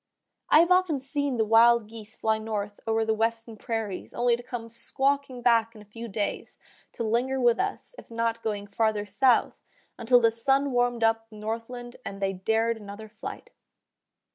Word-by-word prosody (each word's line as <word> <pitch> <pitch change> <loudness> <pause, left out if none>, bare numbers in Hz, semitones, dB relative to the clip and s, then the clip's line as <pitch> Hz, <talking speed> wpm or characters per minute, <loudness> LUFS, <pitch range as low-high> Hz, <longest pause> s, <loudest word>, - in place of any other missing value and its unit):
I 310 - +7
have 340 +2 +1
often 365 -5 +3
seen 275 0 -2
the 220 - +2
wild 230 +1 +5
geese 220 -1 -9
fly 220 0 0
north 205 -2 -4
over 225 0 +1
the 220 - +1
western 225 +1 -1
prairies 220 -4 -4
only 240 0 +3
to 240 - -9
come 240 -2 -6
squawking 265 +2 -1
back 230 -1 +3
in 215 - -12
a - - -20
few 230 +3 -8
days, 205 -1 -4 0.4
to - - -4
linger 245 +4 0
with 240 -2 +3
us, 400 +5 -3
if - - -14
not 230 0 -1
going 205 -2 -3
farther 215 0 0
south, 255 +4 +2 0.4
until 245 +1 +5
the 230 -1 +4
sun 270 +4 +1
warmed 245 -1 +1
up 225 0 +1
the 215 - -14
northland 230 +3 -6
and 195 - -7
they 195 -1 0
dared 225 +4 0
another 210 +1 -9
flight. 215 +1 -9
230 Hz, 180 wpm, -27 LUFS, 220-245 Hz, 0.4 s, I